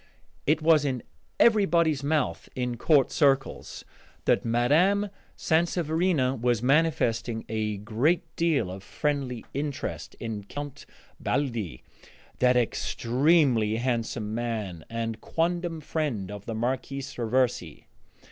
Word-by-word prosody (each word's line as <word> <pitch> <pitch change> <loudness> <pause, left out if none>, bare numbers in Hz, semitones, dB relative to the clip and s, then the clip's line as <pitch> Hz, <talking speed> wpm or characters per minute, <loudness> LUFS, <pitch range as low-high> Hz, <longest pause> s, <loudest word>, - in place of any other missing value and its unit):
It 155 +2 +2
was 155 -2 +5
in 130 -4 -2 0.4
everybody's 170 -10 +4
mouth 145 -1 -1
in 125 -1 -2
court 140 +2 +3
circles 135 -2 0 0.4
that - - +3
Mme. 150 - +3 0.3
Sanseverina 160 -5 +1
was 120 -2 +1
manifesting 125 -6 +1
a 110 -1 -2
great 120 - +1
deal 150 - +1
of 95 +1 -7
friendly 135 +1 -2
interest 140 0 -4
in 110 -3 -4
Count 145 +4 -7 0.3
Baldi, 120 - -2 0.6
that 125 0 +4
extremely 125 -1 +2
handsome 115 -3 -2
man 110 -8 -3
and 115 -1 -3
quondam 170 -1 -1
friend 140 - -2
of 105 -1 -9
the 115 - -3
Marquise 135 +4 -3
Raversi. 120 - 0
130 Hz, 110 wpm, -27 LUFS, 115-155 Hz, 0.6 s, was